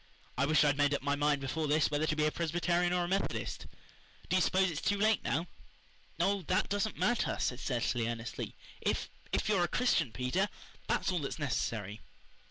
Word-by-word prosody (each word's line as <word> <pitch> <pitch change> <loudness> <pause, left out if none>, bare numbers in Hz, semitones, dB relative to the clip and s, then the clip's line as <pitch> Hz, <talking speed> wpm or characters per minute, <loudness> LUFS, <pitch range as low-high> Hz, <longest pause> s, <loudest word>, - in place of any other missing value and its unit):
"I 140 +2 +1
wish 155 -1 +5
I'd 145 -1 +2
made 145 0 +3
up 140 - -4
my 145 0 +1
mind 145 -1 +1
before 150 +4 -2
this 150 +2 +2
whether 150 +1 +1
to 155 - +1
be 155 0 +2
a 150 - +2
Presbyterian 175 +2 +1
or 180 0 +1
a - - -2
Methodist. 195 +2 -2 0.6
Do - - +2
you 185 - +4
s'pose 185 0 +3
it's 155 - -4
too 205 - +1
late 215 +1 +3
now?" 165 +5 0 0.7
"Oh, 200 0 +2
that 185 - +1
doesn't 205 +1 -1
matter," 240 -1 +1
said 125 - -1
Cecily 120 -3 0
earnestly. 115 0 -5 0.3
"If - - -1 0.2
if - - 0
you're 200 -4 +3
a - - +2
Christian, 170 - +1
Peter, 130 - 0 0.4
that - - +1
is - - +2
all 180 - 0
that's 140 +1 -4
necessary." 110 -7 -2
155 Hz, 200 wpm, -32 LUFS, 140-185 Hz, 0.7 s, wish